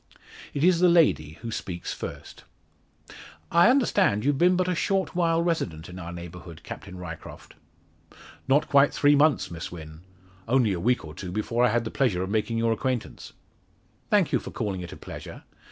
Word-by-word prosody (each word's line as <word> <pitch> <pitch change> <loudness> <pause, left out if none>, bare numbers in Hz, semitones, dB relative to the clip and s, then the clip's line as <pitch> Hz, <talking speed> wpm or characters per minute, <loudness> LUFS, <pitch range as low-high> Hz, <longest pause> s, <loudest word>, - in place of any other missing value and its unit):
It 145 - -1
is 180 -1 +4
the 180 0 +5
lady 150 - +3
who 115 - -4
speaks 90 -4 -5
first: - - -8 1.1
"I 170 +6 +6
understand 235 - +2
you've 140 -1 +1
been 180 +1 +5
but 185 0 +1
a 180 - +1
short 190 +1 -1
while 165 -1 +2
resident 90 - -2
in 90 +1 -9
our 85 -1 -7
neighbourhood, 85 -1 -9
Captain 95 -1 -9
Ryecroft?" 80 -3 -9 0.9
"Not 145 +3 +3
quite 140 -1 +5
three 145 0 +4
months, 145 - +3
Miss 85 0 -6
Wynn. 80 -2 -10 0.5
Only 120 -4 +3
a 90 - -3
week 120 +1 +1
or 75 - -9
two 90 +1 -7
before 115 +4 0
I 125 - +5
had 120 +2 +1
the 110 - -5
pleasure 105 -10 +1
of 95 - -4
making 110 +1 0
your 115 0 +1
acquaintance." 125 +1 -3 0.8
"Thank - - +3
you - - +2
for - - -8
calling 95 -3 -3
it 85 - -8
a - - -9
pleasure. - - -9
115 Hz, 185 wpm, -26 LUFS, -, 1.1 s, I